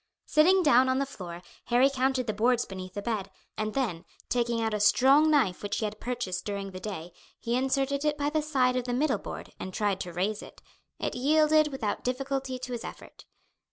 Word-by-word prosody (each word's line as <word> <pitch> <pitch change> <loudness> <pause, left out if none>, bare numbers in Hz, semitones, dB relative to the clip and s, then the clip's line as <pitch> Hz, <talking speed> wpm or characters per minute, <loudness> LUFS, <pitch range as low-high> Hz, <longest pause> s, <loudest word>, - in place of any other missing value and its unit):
Sitting 365 +5 +4
down 260 -3 +5
on 260 - +2
the 275 - +1
floor 180 -9 -9 0.2
Harry 245 +2 +4
counted 265 -1 0
the 215 - -1
boards 240 +3 +2
beneath 185 0 -8
the 205 - -4
bed, 215 -4 -2 0.3
and 215 0 -3
then 215 -11 -1 0.3
taking 235 -1 0
out 225 -1 0
a 210 - 0
strong 270 +8 +5
knife 255 -12 +2
which 205 - -2
he 220 - -1
had 210 0 -5
purchased 240 -7 -3
during 200 -1 -4
the 185 - -7
day 175 -4 -6 0.3
he 235 +1 -1
inserted 270 +2 0
it 300 -1 +1
by 290 0 -1
the 310 0 +1
side 265 -5 +1
of 250 -1 -1
the 245 - -2
middle 295 +4 +1
board - - -8
and 185 - -6
tried 205 -3 0
to 180 - -5
raise 195 +5 -1
it. - - -12 0.4
It - - -3
yielded 305 +3 +4
without 265 -8 -3
difficulty 265 +1 -2
to 250 0 -7
his 240 -1 -4
effort. - - -10
245 Hz, 210 wpm, -28 LUFS, 205-275 Hz, 0.4 s, down